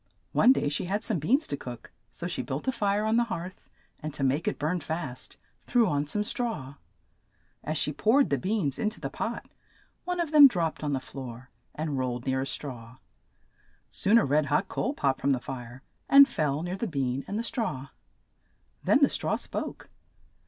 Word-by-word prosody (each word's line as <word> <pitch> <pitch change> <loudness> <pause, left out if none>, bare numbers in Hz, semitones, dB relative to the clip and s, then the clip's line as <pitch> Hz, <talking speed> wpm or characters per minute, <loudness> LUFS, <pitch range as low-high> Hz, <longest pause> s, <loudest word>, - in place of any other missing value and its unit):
One 250 - +6
day 260 - +2
she 145 +4 -2
had 205 +4 -1
some 205 -7 -1
beans 265 - +2
to - - -2
cook, 125 -4 -9 0.2
so 175 - -7
she 175 - -2
built 140 - -5
a - - +4
fire 205 -3 0
on 220 +1 +2
the 240 - +3
hearth, 185 -5 -7 0.3
and 155 - -5
to 135 - -3
make 140 +5 +1
it - - 0
burn 160 +5 -1
fast 155 -5 -5 0.2
threw 240 -3 +2
on 145 0 0
some 210 +7 0
straw. 215 - -3 0.9
As 155 +1 -2
she 150 - 0
poured 255 - +3
the 140 - +2
beans 185 - -1
in 215 - +1
to 215 - -12
the - - -5
pot, - - -4 0.6
one 360 0 -2
of 335 -3 -1
them 295 -2 +10
dropped 170 -10 -2
on 145 -1 0
the 135 - 0
floor 130 -1 -9 0.2
and 150 -3 -2
rolled 125 -1 -2
near 130 0 0
a 135 - -2
straw. 125 -4 -6 0.9
Soon 210 +4 +3
a 230 - +4
red 145 +2 +2
hot 150 +7 +1
coal 275 - -2
popped 135 - 0
from 140 +1 +3
the 130 - 0
fire, 125 0 -8 0.3
and 280 0 +9
fell 150 - -1
near 180 +2 -3
the 230 - -2
bean 135 -5 -1
and 205 - -3
the 230 - -1
straw. 180 - -3 0.9
Then - - +4
the - - +8
straw - - -1
spoke. - - -5
155 Hz, 200 wpm, -28 LUFS, 135-215 Hz, 0.9 s, them